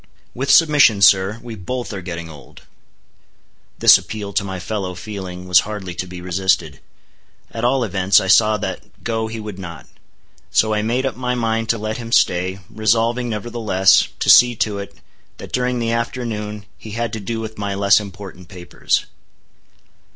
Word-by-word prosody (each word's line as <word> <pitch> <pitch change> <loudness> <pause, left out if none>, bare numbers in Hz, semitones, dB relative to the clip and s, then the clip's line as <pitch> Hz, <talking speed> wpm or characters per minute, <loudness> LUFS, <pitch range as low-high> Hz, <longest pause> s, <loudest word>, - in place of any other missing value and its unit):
With 135 +3 -4
submission, 145 -10 +5
sir, 95 +4 +4
we 120 -1 -7
both 120 +4 -5
are 95 - -5
getting 85 -2 -6
old." 75 -3 -14 1.1
This - - +7
appeal 105 -2 -7
to 100 - +1
my 95 -2 -5
fellow 95 -1 -4
feeling 90 -2 -7
was 90 -2 +6
hardly 100 -4 -5
to 90 +1 -5
be 90 0 -9
resisted. 90 -5 0 0.7
At 115 - -6
all 125 +1 +2
events, 95 -3 +3
I - - -3
saw 110 +2 +4
that - - -7
go 110 -1 -2
he 110 0 -6
would 105 -3 -8
not. 85 -3 -9 0.6
So 110 0 +2
I 105 - 0
made 120 +5 -1
up 135 - -2
my 125 0 -2
mind 115 -1 -1
to 115 - +2
let 110 0 -4
him 115 -1 -8
stay, 90 -2 +2
resolving, 115 +3 0
nevertheless, 110 -3 +2
to - - -1
see 120 -1 +7
to 105 -2 -1
it, 100 - -8 0.4
that - - -10
during 125 0 0
the 115 -1 -1
afternoon 110 -3 -4
he 110 - -10
had 120 -1 -2
to 110 - -3
do 115 +3 -4
with 110 -1 -7
my 100 -1 -3
less 100 +1 +4
important 95 -3 -10
papers. 90 -1 -2
105 Hz, 175 wpm, -19 LUFS, 95-115 Hz, 1.1 s, This